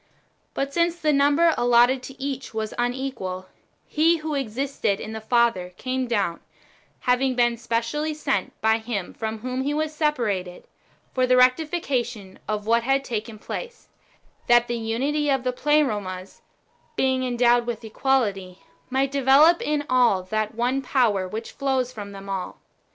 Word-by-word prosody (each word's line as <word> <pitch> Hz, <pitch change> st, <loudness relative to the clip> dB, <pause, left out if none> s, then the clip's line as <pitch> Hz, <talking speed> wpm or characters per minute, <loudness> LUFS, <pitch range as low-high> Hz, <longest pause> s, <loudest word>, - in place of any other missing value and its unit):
But 275 Hz, 0 st, -2 dB
since 340 Hz, +1 st, +2 dB
the 310 Hz, -3 st, +1 dB
number 290 Hz, +4 st, +4 dB
allotted 245 Hz, +2 st, +4 dB
to 270 Hz, +1 st, -11 dB
each 270 Hz, -3 st, -5 dB
was 220 Hz, -1 st, -3 dB
unequal, 245 Hz, -7 st, -3 dB, 0.4 s
He 325 Hz, +2 st, +2 dB
wdio 305 Hz, -3 st, -1 dB
existed 245 Hz, -4 st, -2 dB
in 220 Hz, -, -6 dB
the 220 Hz, 0 st, -6 dB
Father 220 Hz, -6 st, +1 dB
came 255 Hz, 0 st, -2 dB
down, 200 Hz, -8 st, 0 dB, 0.6 s
having 255 Hz, +1 st, +1 dB
been 240 Hz, -1 st, +3 dB
specially 235 Hz, +7 st, -2 dB
sent 275 Hz, -10 st, -2 dB
by 220 Hz, +1 st, +3 dB
Him 220 Hz, -5 st, -4 dB
from 220 Hz, -1 st, -4 dB
whom 255 Hz, +2 st, -3 dB
He 285 Hz, +2 st, -1 dB
w^as 310 Hz, 0 st, -1 dB
separated, 230 Hz, -, -1 dB, 0.5 s
for 255 Hz, -1 st, +2 dB
the 255 Hz, 0 st, +4 dB
rectification 255 Hz, -, +1 dB
of 210 Hz, -1 st, -2 dB
what 230 Hz, +1 st, +3 dB
had 270 Hz, +3 st, +1 dB
taken 220 Hz, -3 st, -4 dB
place, 475 Hz, -, -7 dB, 0.6 s
that 240 Hz, 0 st, +5 dB
the 240 Hz, -, -2 dB
unity 275 Hz, +7 st, -1 dB
of 270 Hz, -2 st, +1 dB
the 255 Hz, -1 st, -1 dB
Pleromas, 210 Hz, -11 st, -1 dB, 0.5 s
being 260 Hz, -1 st, +1 dB
endowed 240 Hz, -1 st, +2 dB
with 235 Hz, -1 st, -4 dB
equality, 205 Hz, -6 st, -1 dB, 0.3 s
might 265 Hz, +1 st, 0 dB
develop 280 Hz, +5 st, +5 dB
in 295 Hz, -1 st, -1 dB
all 240 Hz, -7 st, +3 dB
that 215 Hz, +3 st, -2 dB
one 250 Hz, +4 st, 0 dB
power 230 Hz, -8 st, +1 dB
which 220 Hz, +4 st, -6 dB
flows 265 Hz, -2 st, -1 dB
from 200 Hz, -2 st, -8 dB
all. 195 Hz, -2 st, -4 dB
245 Hz, 150 wpm, -24 LUFS, 220-275 Hz, 0.6 s, that